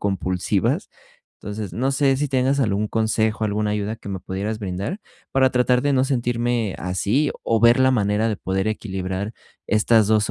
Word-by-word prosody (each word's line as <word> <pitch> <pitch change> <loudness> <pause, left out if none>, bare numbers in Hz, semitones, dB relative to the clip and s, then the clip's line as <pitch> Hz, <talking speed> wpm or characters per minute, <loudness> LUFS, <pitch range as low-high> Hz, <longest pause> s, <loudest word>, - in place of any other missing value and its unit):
compulsivas. 95 -2 -1 0.5
Entonces, 105 -2 -5
no 130 +4 0
sé 135 -1 +2
si 145 -1 0
tengas 135 +2 +1
algún 105 -2 0
consejo, 110 0 0
alguna 105 0 0
ayuda 105 +1 -2
que 100 - -11
me 95 -2 -4
pudieras 100 +4 -4
brindar 100 - -4 0.3
para 130 -1 +4
tratar 125 0 +2
de 145 -1 +1
no 130 0 +3
sentirme 120 -4 0
así, 100 +11 0
o 115 -1 +1
ver 120 +1 +6
la 130 0 +5
manera 105 -2 +1
de 105 - -1
poder 95 +3 -1
equilibrar 95 0 -3 0.3
estas 110 0 +3
2 110 -1 +2
110 Hz, 170 wpm, -22 LUFS, 100-125 Hz, 0.5 s, ver